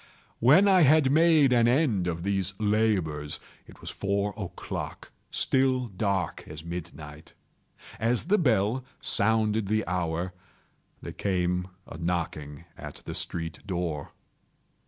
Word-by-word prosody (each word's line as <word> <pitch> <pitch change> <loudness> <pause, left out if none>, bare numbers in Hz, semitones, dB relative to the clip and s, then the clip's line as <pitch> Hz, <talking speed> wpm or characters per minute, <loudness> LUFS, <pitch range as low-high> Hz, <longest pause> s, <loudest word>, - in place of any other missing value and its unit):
When 150 - +6
I 190 -2 +6
had 150 -2 +5
made 155 -3 +5
an 120 -1 +4
end 120 - +2
of 85 -1 -3
these 95 0 -1
labors, 100 -9 0 0.3
it - - -16
was - - -6
four 100 +1 -1
o'clock—still 130 +5 -2
dark 100 -1 -2
as 80 +1 -9
midnight. 80 -3 -8 0.6
As 115 +2 +1
the 205 +5 +2
bell 120 - +2 0.2
sounded 110 0 +1
the 110 +2 0
hour, 85 0 -2 0.7
there - - -6
came 90 -2 -1 0.2
a 80 - -10
knocking 80 -3 -3
at - - -10
the - - -5
street 80 -2 -4
door. 85 -6 -3
100 Hz, 120 wpm, -27 LUFS, 85-120 Hz, 0.7 s, When